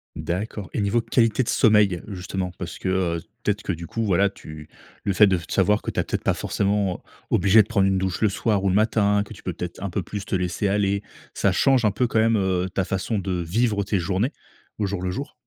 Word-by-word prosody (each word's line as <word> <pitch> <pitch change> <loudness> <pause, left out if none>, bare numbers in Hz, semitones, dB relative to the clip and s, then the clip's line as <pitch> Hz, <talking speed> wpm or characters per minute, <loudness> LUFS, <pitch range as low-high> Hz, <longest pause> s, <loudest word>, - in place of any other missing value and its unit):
D'accord 95 +2 -4
et - - -1
niveau 105 +4 +1
qualité 115 0 +2
de 120 - -2
sommeil 105 -5 +3
justement 95 -2 -4
parce 85 -1 -6
que, - - -5 0.3
heu, - - -7 0.2
peut-être 105 -1 -1
que - - -1
du 85 -1 -6
coup 115 - -3
voilà 100 -1 +3
tu 75 -5 -11 0.4
le 100 - +1
fait 105 - +7
de 95 -3 +2
f 85 - -12
t - - -5
savoir 105 +3 +3
que - - -4
tu - - -3
as - - +2
peut-être - - -3
pas - - +1
forcément 100 -2 -1 0.3
obligé 100 +4 +5
de - - -16
prendre 100 -4 +2
une 95 0 +2
douche 95 -1 -2
le 110 - +4
soir 100 0 0
ou 100 - +2
le 95 - +1
matin 105 -1 +2
que 110 - -10
tu 95 - -14
peux 90 - -4
peut-être 90 +2 -7
un 100 - -3
peu 90 +2 -2
plus 105 +2 -6
te - - -2
laisser 90 +2 -1
aller 100 0 +1 0.3
ça - - +1
change 135 -3 +3
un 105 - +4
peu 110 +5 0
quand 115 -2 +1
même, 115 0 +3
heu, 95 -2 0
ta 95 +1 -1
façon 95 +4 -2
de 95 -3 -2
vivre 100 +4 0
tes 100 +1 0
journées 95 - -1 0.4
au 105 - 0
jour 100 -2 -3
le 90 - -2
jour? 140 +11 -5
100 Hz, 250 wpm, -23 LUFS, 95-105 Hz, 0.4 s, fait